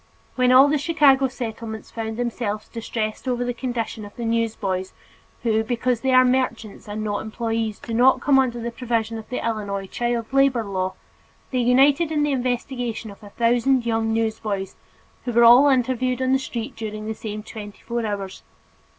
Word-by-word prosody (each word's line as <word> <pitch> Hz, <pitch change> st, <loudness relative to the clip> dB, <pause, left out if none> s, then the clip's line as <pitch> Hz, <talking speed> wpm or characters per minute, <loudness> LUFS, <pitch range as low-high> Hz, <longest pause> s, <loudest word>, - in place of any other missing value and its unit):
When 255 Hz, -1 st, +3 dB
all 260 Hz, +2 st, +8 dB
the 295 Hz, 0 st, +1 dB
Chicago 285 Hz, -4 st, +4 dB
Settlements 225 Hz, -3 st, -6 dB
found 225 Hz, -1 st, -4 dB
themselves 230 Hz, -3 st, -3 dB
distressed 225 Hz, 0 st, -4 dB
over 245 Hz, -1 st, 0 dB
the 245 Hz, -, -1 dB
condition 235 Hz, -3 st, -4 dB
of 205 Hz, 0 st, -11 dB
the 235 Hz, -, -5 dB
newsboys 215 Hz, -5 st, -1 dB, 0.5 s
who, 220 Hz, -2 st, +2 dB
because 245 Hz, 0 st, -1 dB
they 265 Hz, -, +1 dB
are 255 Hz, 0 st, +6 dB
merchants 250 Hz, -5 st, -1 dB
and 210 Hz, +1 st, -4 dB
not 205 Hz, -1 st, -2 dB
employees, 225 Hz, -1 st, -2 dB
do 230 Hz, -, -7 dB
not 250 Hz, +3 st, +5 dB
come 275 Hz, -2 st, +4 dB
under 245 Hz, -2 st, 0 dB
the 235 Hz, +1 st, -4 dB
provisions 230 Hz, -2 st, -2 dB
of 220 Hz, -, -12 dB
the 250 Hz, -, -3 dB
Illinois 205 Hz, -3 st, -2 dB
child 240 Hz, +3 st, -2 dB
labor 270 Hz, -4 st, +3 dB
law, 185 Hz, -2 st, -2 dB, 0.6 s
they 255 Hz, -, 0 dB
united 275 Hz, +6 st, +4 dB
in 300 Hz, -1 st, +1 dB
the 295 Hz, -, +1 dB
investigation 245 Hz, -3 st, -2 dB
of 200 Hz, -, -15 dB
a 205 Hz, -, -11 dB
thousand 240 Hz, +3 st, +2 dB
young 225 Hz, -1 st, 0 dB
newsboys, 220 Hz, -3 st, -2 dB, 0.5 s
who 245 Hz, -, -2 dB
were 235 Hz, +1 st, +5 dB
all 245 Hz, +5 st, +8 dB
interviewed 255 Hz, -1 st, +1 dB
on 260 Hz, 0 st, +1 dB
the 265 Hz, -, +3 dB
streets 235 Hz, -3 st, -5 dB
during 215 Hz, -1 st, -5 dB
the 220 Hz, -, -2 dB
same 215 Hz, -1 st, -6 dB
twenty 210 Hz, -2 st, -9 dB
four 235 Hz, 0 st, -2 dB
hours. 200 Hz, -3 st, -4 dB
235 Hz, 180 wpm, -23 LUFS, 220-255 Hz, 0.6 s, all